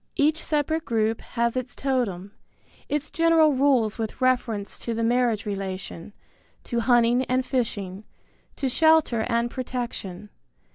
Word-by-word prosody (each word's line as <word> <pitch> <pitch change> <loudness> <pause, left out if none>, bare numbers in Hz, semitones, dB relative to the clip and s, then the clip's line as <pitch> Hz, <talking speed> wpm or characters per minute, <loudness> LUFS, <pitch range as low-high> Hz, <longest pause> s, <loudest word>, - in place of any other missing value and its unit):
Each 310 +3 +2
separate 315 +1 0
group 225 -3 0
has 235 0 -1
its 255 -1 -3
totem, 220 -9 -2 0.6
its 295 0 -2
general 330 -2 +4
rules 255 -5 +2
with 220 +1 -4
reference 245 -5 0
to 235 - -3
the 230 - -1
marriage 235 -2 +1
relation, 190 -3 -5 0.5
to 235 - -2
hunting 240 +1 +3
and 255 +1 0
fishing, 205 -7 -2 0.5
to 275 - -2
shelter 315 -4 +3
and 235 0 0
protection. 240 -7 -5
240 Hz, 130 wpm, -25 LUFS, 220-265 Hz, 0.6 s, general